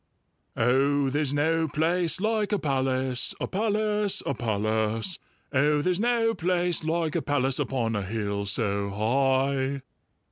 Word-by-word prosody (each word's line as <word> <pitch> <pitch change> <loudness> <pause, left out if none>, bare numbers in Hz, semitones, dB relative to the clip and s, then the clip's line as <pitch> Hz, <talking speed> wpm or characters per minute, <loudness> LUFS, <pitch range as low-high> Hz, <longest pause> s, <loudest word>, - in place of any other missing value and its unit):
"Oh, 135 +3 +2
there's 145 -1 0
no 160 +3 +1
place 165 +2 +1
like 215 0 0
a 205 - +2
palace, 130 -4 +1
A - - -2
palace, 210 0 0
a - - -1
palace! 110 - -1 0.3
Oh, 145 +2 +2
there's 180 +1 0
no 230 0 +1
place 175 -2 +1
like 160 -1 -1
a - - +1
palace 135 -2 +1
Upon 115 -4 -1
a 105 - -1
hill 100 0 -3
so 100 0 -1
high!" 135 +5 0
140 Hz, 135 wpm, -26 LUFS, 125-175 Hz, 0.3 s, Oh